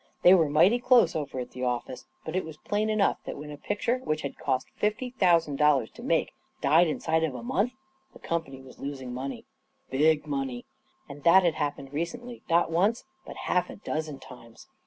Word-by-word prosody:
They 180 - +9
were 165 -5 +4
mighty 180 +11 +4
close 245 -8 +4
over 145 -4 -3
at 125 - -6
the 125 - -6
office, 125 0 -3 0.2
but 160 - -4
it 185 - +1
was 160 -1 -9
plain 210 +6 -1
enough 215 -2 +2
that - - -5
when 150 +1 -8
a - - -6
picture 210 - -1
which 155 -11 -2
hid 140 - -4
cost 130 - -2
fifty 215 +4 -2
thousand 170 - +2
dollars 145 -6 +3
to - - -13
make - - 0 0.3
died 160 +5 +4
inside 160 +1 0
of 150 -5 -1
a 120 - -7
month 205 - 0 0.4
the - - -14
company 160 -6 -4
was 130 - -15
los 140 0 -5
ing 125 -2 -7
money. 135 +2 -5 0.5
Big 150 +3 +3
money. 135 -4 -3 0.4
And 145 -1 -10
that 185 +3 +7
had 170 -2 +3
happened 145 -2 -4
recently 240 +10 -5
not 170 0 +3
once, 200 +8 +2 0.2
but - - -8
half 180 -1 +1
a - - -8
dozen 155 -6 -4
times. 125 -3 -14
155 Hz, 200 wpm, -27 LUFS, 135-185 Hz, 0.5 s, They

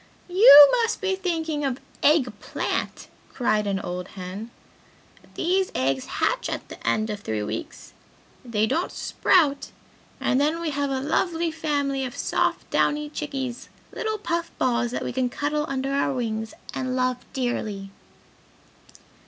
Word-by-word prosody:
"You 295 -7 +10
must 455 - 0
be 385 -1 0
thinking 325 -5 -2
of 265 -2 -1 0.2
eggplant!" 260 -8 0 0.2
cried 215 -4 0
one 195 -1 0
old 180 -1 -5
hen. 190 +4 -7 0.9
"These 370 +2 +1
eggs 130 0 0
hatch - - -1
at - - -5
the - - -9
end 215 0 +1
of 210 - -4
three 110 - -3
weeks 105 - -6 0.5
they 220 -4 0
don't 335 +11 -1
sprout 295 -6 +2 0.5
and 260 - +1
then 310 +3 +1
we 335 -2 -2
have 285 0 -1
a 265 -1 -1
lovely 330 +3 0
family 285 -4 -1
of 250 -2 -5
soft - - 0
downy 295 0 +1
chickies; 270 -5 -5 0.2
little 435 -1 -2
puff 340 -4 -2
balls 240 -1 +1
that 245 - -3
we - - -3
can 255 0 0
cuddle 300 +3 -1
under 270 0 -2
our 275 -1 +1
wings 220 -2 -3 0.2
and 255 -1 -2
love 255 -1 +1
dearly!" 215 -6 -3
270 Hz, 145 wpm, -25 LUFS, 225-315 Hz, 0.9 s, You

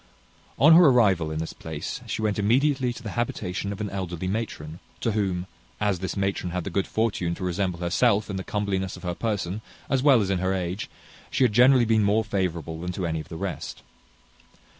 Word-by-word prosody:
On 155 +4 +7
her 175 +2 +8
arrival 100 - +4
in 80 - -4
this 80 +1 -4
place, 80 -2 -6
she 110 - -3
went 105 -1 0
immediately 130 +4 +2
to 120 0 -9
the 105 - -5
habitation 100 -4 -2
of 100 - -6
an 105 -2 -3
elderly 95 -2 -4
matron; 90 -6 -4 0.2
to 115 - 0
whom, 95 -4 -1 0.3
as 105 -4 +1
this 95 +2 -4
matron 95 -2 -1
had 90 0 -3
the 100 - -5
good 95 +2 0
fortune 100 -6 0
to - - -7
resemble 90 -1 -1
herself 100 +4 +2
in 100 - -4
the 95 - -3
comeliness 95 -3 -2
of 90 - -13
her 90 -1 -2
person, 105 -1 -2 0.3
as 135 -2 +3
well 135 -3 +6
as 100 -2 0
in 95 - +1
her 95 +1 0
age, 90 +2 -3 0.4
she - - +1
had 120 -4 +3
generally 125 +1 +6
been 110 -1 +3
more 105 +2 +3
favourable 85 -6 -2
than 90 +1 -3
to 90 0 -3
any 80 -1 -1
of 75 - -9
the 80 - -6
rest. - - -5
100 Hz, 210 wpm, -25 LUFS, 90-110 Hz, 0.4 s, her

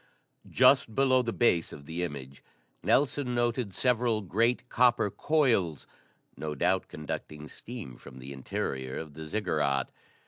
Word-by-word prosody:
Just 110 - +4
below 130 -1 +4
the 115 -2 -2
base 90 -9 +2
of 70 - -10
the 80 +4 -4
image, 70 -5 -6 0.4
Nelson 140 -3 +1
noted 120 -2 0
several 120 -1 +1
great, 115 +6 +1
copper 120 -4 +3
coils, 115 - +1 0.5
no 75 -1 -4
doubt 90 +3 +1
conducting 75 0 -6
steam 110 - -9
from 65 - -13
the 65 +2 -8
interior 65 0 -4
of 80 -2 -7
the 80 +1 -8
Ziggurat. 75 -8 0
95 Hz, 135 wpm, -29 LUFS, 75-120 Hz, 0.5 s, Just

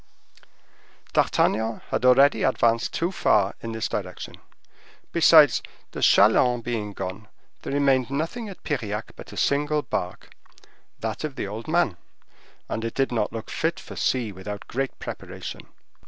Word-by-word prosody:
D'Artagnan 110 +1 +1
had - - -1
already 135 +3 +6
advanced 115 -3 +2
too 170 +2 -1
far 100 - +2
in 115 - -5
this 110 0 -2
direction; 90 -3 -5 0.7
besides, 155 -5 +6 0.3
the - - -6
chalands 120 -1 +5
being 110 -4 -3
gone, 95 +3 -6 0.3
there - - -5
remained 135 -3 +2
nothing 165 - -3
at 195 - -12
Piriac 110 -7 -3
but - - -11
a - - -10
single 150 +1 +1
bark—that 110 - -7
of 150 -3 -4
the - - -3
old 105 +3 -7
man, 155 - +1 0.7
and 115 - -3
it 115 - -4
did 135 -1 +1
not 110 -3 0
look 115 0 -7
fit 160 +1 -1
for - - -10
sea 120 -5 0
without 100 +2 -7
great 135 +2 -3
preparation. - - -8
120 Hz, 140 wpm, -25 LUFS, 110-145 Hz, 0.7 s, already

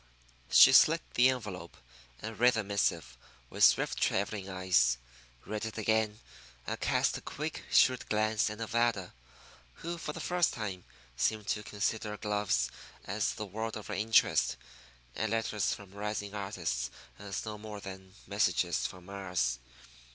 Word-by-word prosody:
She - - +9
slit 165 +2 +6
the 125 +2 +6
envelope, 105 -9 -5 0.5
and 110 0 -6
read 125 +1 +5
the 110 - 0
missive 100 0 -1 0.4
with - - 0
swift - - +4
travelling 100 0 0
eyes; 90 -11 +2 0.5
read 105 +1 -4
it 110 0 -5
again, 110 0 +1 0.5
and - - -3
cast - - +1
a - - -18
quick, 155 +2 -5
shrewd 130 -1 +4
glance 110 0 +1
at 105 - -6
Nevada, 115 -4 0 0.7
who, 170 0 -3
for 150 - -4
the 180 +3 -3
time, 100 -7 -5 0.3
seemed 105 - 0
to 105 - 0
consider 105 +1 -2
gloves 105 - 0 0.3
as - - -1
the 105 - -5
world 110 +3 -4
of 105 - -9
her - - -5
interest, 110 +2 +3 0.6
and 110 - -1
letters 115 -2 0
from 100 -3 -7
rising 105 0 -4
artists 95 -12 -3 0.3
as 100 0 -5
no 105 -1 -6
more 105 -1 -7
than 95 -1 -10
messages - - +1
from 90 -1 -12
Mars. 90 -10 -2
105 Hz, 145 wpm, -31 LUFS, 95-110 Hz, 0.7 s, She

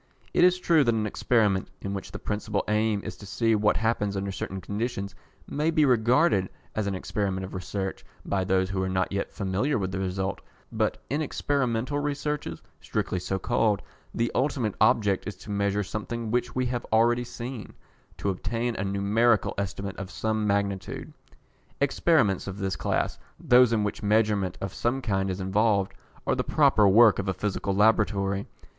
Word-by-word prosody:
It - - +4
is 180 0 +5
true 165 -4 +4
that 120 -3 +2
an 110 -1 0
experiment, 105 -2 +1
in 100 - -4
which 100 - -6
the - - -5
principal 105 0 -2
aim 105 -1 +1
is - - -6
to 100 - -11
see 115 +3 +1
what 105 -1 +3
happens 105 -3 0
under 100 0 -2
certain 95 0 -5
conditions, 100 0 -3 0.3
may 150 +3 0
be 155 -2 +3
regarded 125 - +3 0.2
as 110 -2 -1
an 100 - -1
experiment 95 0 -2
of 95 - -10
research 95 +1 -4 0.2
by 95 -1 0
those 95 0 +1
who 95 -1 -1
are 95 - -1
not 95 0 0
yet 100 0 -2
familiar 100 +9 0
with 95 -3 -2
the 95 - -3
result, 95 +1 -2 0.3
but - - 0
in 145 +3 +1
experimental 140 -2 -1
researches, 145 - -3 0.2
strictly 90 - -2
so 95 +2 -2
called, 105 +1 +1 0.3
the 115 0 -1
ultimate 125 -6 0
object 100 -4 +3
is 105 - -4
to 100 +3 -10
measure 100 0 0
something 110 +3 -4
which 125 +1 -1
we 130 0 +1
have 120 -1 -2
already 120 +2 +4
seen 120 0 -7 0.4
to 100 - -1
obtain 115 +5 -2
a 95 - -1
numerical 100 +4 +2
estimate 100 0 -4
of 100 -1 -6
some 110 0 -1
magnitude. 100 -2 -2 0.7
Experiments 140 - +2
of 100 0 -5
this 95 -2 -2
class - - -1 0.2
those 125 -1 +5
in 110 -2 +2
which 105 - -3
measurement 105 -3 +1
of 95 -1 -4
some 120 +3 0
kind 95 -6 -1
is 95 0 -3
involved, 100 +1 +1 0.3
are - - +2
the - - 0
proper 105 -2 +4
work 110 +1 +6
of 100 - -2
a 95 - -1
Physical 100 -1 -2
Laboratory. 100 -2 +2
105 Hz, 175 wpm, -27 LUFS, 95-120 Hz, 0.7 s, work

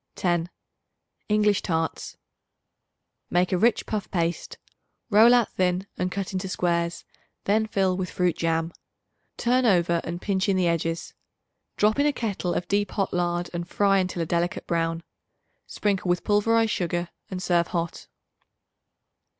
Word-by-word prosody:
10. 175 -1 0 0.8
English 210 -1 +3
Tarts. 165 -3 -2 1.1
Make 180 +2 +2
a 185 - +2
rich 230 +3 +3
puff 210 -2 -3
paste; 170 -2 -2 0.5
roll 220 +3 +7
out 245 -3 +4
thin 185 0 0
and 180 0 -2
cut 195 0 -4
into 185 0 -2
squares; 170 -2 -1 0.4
then 220 +2 +2
fill 190 -3 +1
with 180 -1 -3
fruit 180 -2 0
jam; 165 0 -1 0.6
turn 250 +2 +2
over 175 -6 +3
and 170 +1 -5
pinch 195 0 0
in 190 - +2
the 180 -2 +2
edges. 165 0 -2 0.6
Drop 215 +4 +3
in 290 - +4
a 295 - +2
kettle 200 -7 -2
of 175 - -2
deep 205 +1 +1
hot 195 -2 -2
lard 175 0 -1
and 170 0 -4
fry 200 -1 +3
until 180 -2 -1
a - - -3
delicate 170 +2 -1
brown. 165 0 -1 0.6
Sprinkle 195 -3 -1
with 175 0 +1
pulverized 225 +2 +2
sugar 175 -1 -1 0.2
and 185 -1 -5
serve 170 -2 +2
hot. 170 -1 -4
180 Hz, 150 wpm, -25 LUFS, 170-205 Hz, 1.1 s, roll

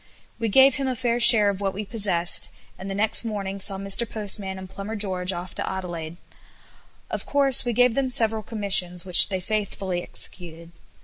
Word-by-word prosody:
We 230 -1 -2
gave 265 +5 +4
him 275 -1 -3
a 255 - -3
fair 240 -1 -2
share 220 -3 +8
of 200 0 -5
what 195 -1 -3
we 210 +1 -6
possessed, 195 -5 +1 0.3
and 190 +1 -10
the 195 - -5
next 215 +3 +1
morning 200 -3 -6
saw 195 0 +1
Mr 195 +4 +1
Postman 200 -3 -5
and 190 0 -10
Plumber 200 +3 -8
George 190 -3 -3
off 180 0 -8
to - - -6
Adelaide. 175 -3 -7 0.9
Of - - -6
course 275 -2 +3
we 240 - -2
gave 245 +1 +2
them 270 +1 -2
several 225 -3 +1
commissions, 190 -5 +1
which 180 -2 +6
they 190 -2 -3
faithfully 190 -2 -4
executed. 170 -2 -5
200 Hz, 185 wpm, -22 LUFS, 185-225 Hz, 0.9 s, share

